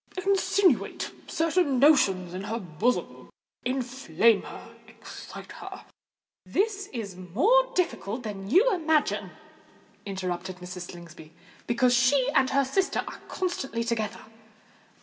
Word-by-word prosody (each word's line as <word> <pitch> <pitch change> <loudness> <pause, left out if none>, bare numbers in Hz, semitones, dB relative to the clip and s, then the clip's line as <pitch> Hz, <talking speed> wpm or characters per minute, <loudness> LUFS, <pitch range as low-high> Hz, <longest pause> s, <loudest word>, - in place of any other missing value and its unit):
Insinuate 390 -5 +2 0.2
certain 325 -4 +1
notions 200 - +4
into 190 +2 -5
her 225 +2 -2
bosom—inflame 245 - -1
her—excite - - -11
her——" - - -9 0.6
"This 400 0 -1
is 215 -7 -5
more 345 - +2
difficult 245 - -1
than 200 -3 -6
you 405 - +5
imagine," 320 -4 +1 0.7
interrupted 185 -2 -4
Mrs. 180 0 -8
Slingsby: 165 -2 -12 0.3
"because 245 +1 +3
she 255 +2 +3
and 265 -3 +3
her 275 0 +2
sister 375 +9 0
are - - -8
constantly 270 -10 -2
together." 230 -2 -3
245 Hz, 105 wpm, -27 LUFS, 195-315 Hz, 0.7 s, you